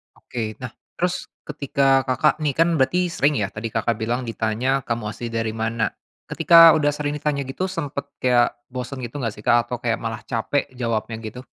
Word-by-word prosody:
Oke. 110 Hz, -3 st, -5 dB
Nah, 125 Hz, -2 st, -5 dB, 0.2 s
terus 180 Hz, 0 st, -1 dB, 0.2 s
ketika 140 Hz, -2 st, +2 dB
Kakak 150 Hz, +5 st, +2 dB
nih 145 Hz, -3 st, -1 dB
kan 165 Hz, +1 st, +4 dB
berarti 175 Hz, +7 st, +2 dB
sering 145 Hz, -2 st, +2 dB
ya 100 Hz, -4 st, -1 dB
tadi 110 Hz, +2 st, -5 dB
Kakak 115 Hz, 0 st, -1 dB
bilang 120 Hz, +3 st, -1 dB
ditanya, 115 Hz, +4 st, 0 dB
"Kamu 115 Hz, -2 st, -2 dB
asli 120 Hz, +1 st, -6 dB
dari 115 Hz, -1 st, -2 dB
mana?" 110 Hz, -1 st, -1 dB, 0.3 s
Ketika 165 Hz, -1 st, +7 dB
udah 150 Hz, -2 st, +2 dB
sering 145 Hz, 0 st, -2 dB
ditanya 140 Hz, -2 st, -1 dB
gitu 185 Hz, +8 st, -3 dB
sempet 145 Hz, -5 st, -4 dB
kayak 120 Hz, -2 st, +2 dB
bosen 125 Hz, +2 st, -5 dB
gitu 120 Hz, +5 st, -6 dB
nggak 115 Hz, -3 st, -2 dB
sih, 105 Hz, -, -12 dB
Kak? 120 Hz, 0 st, +4 dB
Atau 125 Hz, -, -2 dB
kayak 115 Hz, -2 st, 0 dB
malah 115 Hz, -1 st, -4 dB
capek 130 Hz, +4 st, -1 dB
jawabnya 115 Hz, -2 st, -2 dB
gitu? 120 Hz, +4 st, -8 dB
125 Hz, 185 wpm, -22 LUFS, 115-145 Hz, 0.3 s, Ketika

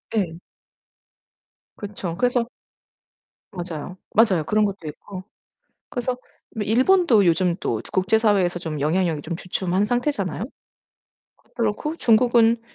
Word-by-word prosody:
예. 175 Hz, -6 st, -1 dB, 1.4 s
그쵸. 200 Hz, -5 st, -5 dB
그래서 245 Hz, -1 st, +1 dB, 1.0 s
맞아요. 175 Hz, -2 st, -6 dB, 0.2 s
맞아요. 205 Hz, -7 st, +4 dB
그런 215 Hz, +5 st, +2 dB
것도 195 Hz, -5 st, -4 dB
있고. 185 Hz, +5 st, -8 dB, 0.7 s
그래서 250 Hz, 0 st, -2 dB, 0.4 s
뭐 215 Hz, -, -2 dB
일본도 250 Hz, -, +4 dB
요즘 170 Hz, +1 st, +2 dB
또 -, -, -1 dB
국제사회에서 195 Hz, -2 st, +2 dB, 0.2 s
영향력이 160 Hz, 0 st, +1 dB
좀 165 Hz, +2 st, -4 dB
주춤한 185 Hz, +2 st, -1 dB
상태잖아요. 215 Hz, -, -1 dB, 1.1 s
그렇고 235 Hz, +7 st, -1 dB
중국은 235 Hz, -2 st, +4 dB
205 Hz, 250 characters per minute, -23 LUFS, 180-230 Hz, 1.4 s, 맞아요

